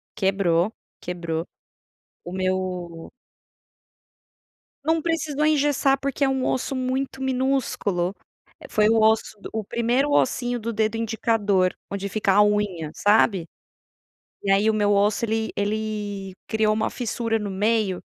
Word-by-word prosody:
quebrou, 190 -1 +1 0.3
quebrou, 170 -2 -3 0.8
o 175 - -8
meu 185 -3 -3 1.7
Não 320 +1 +2
precisou 310 -3 -1
engessar 290 -2 +3
porque 275 0 0
é - - +3
um 265 -1 0
osso 265 +2 -1
muito 260 +1 -2
minúsculo, 255 -9 0 0.5
foi 210 0 +3
o 225 0 +4
osso 220 -1 +2
do - - -8
o 220 -1 -3
1º 240 +7 +1
ossinho 245 -3 +1
do 230 0 -4
dedo 220 +1 0
indicador 220 -4 +1 0.2
onde 200 0 -3
fica 200 0 +1
a 205 +2 +6
unha, 205 -7 0
sabe? 205 -4 +3 1.0
E 200 - -1
aí 200 +2 +4
o - - 0
meu 205 -1 +2
osso 205 +3 +2
ele 225 0 -1
ele 205 -2 -3
criou 220 -1 +2
uma 220 0 0
fissura 230 -2 -2
no 210 -2 -4
meio 205 -1 +1
215 Hz, 130 wpm, -24 LUFS, 195-245 Hz, 1.7 s, a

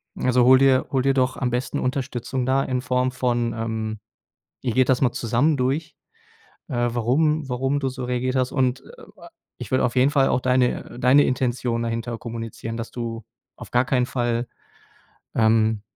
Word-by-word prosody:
also 125 -1 +2
hol 130 +2 +7
dir 130 -1 +3
hol 130 -2 +1
dir 135 0 +3
doch 130 -1 0
am 125 -2 -1
besten 125 +2 -2
Unterstützung 130 -1 -2
da 135 +1 +2
in 125 -1 -2
Form 125 -1 0
von 120 -2 -1
ähm, 110 -1 -3 0.6
ihr 120 -4 -2
geht 130 +1 +3
das 125 - +2
mal 130 -2 +2
zusammen 125 +7 +1
durch, 140 +4 -2 0.7
äh, 120 -1 0
warum 140 +6 +1
warum 135 +3 0
du 135 -2 -1
so 130 0 -7
reagiert 125 +1 -1
hast. 130 -1 0
Und, 130 -1 0
äh, - - -15 0.5
ich - - -8
würde 130 -1 +2
auf 120 - -2
jeden 130 +3 +4
Fall 140 -2 +3
auch 125 - +1
deine 125 -1 0
deine 130 +4 +5
Intention 125 -2 -1
dahinter 115 0 -3
kommunizieren, 115 -1 -6
dass 115 0 -6
du 115 -2 -5 0.3
auf - - -11
gar 125 +1 +3
keinen 130 -2 +1
Fall 120 -1 -1 0.9
ähm, 110 -1 +3
125 Hz, 175 wpm, -23 LUFS, 120-130 Hz, 0.9 s, hol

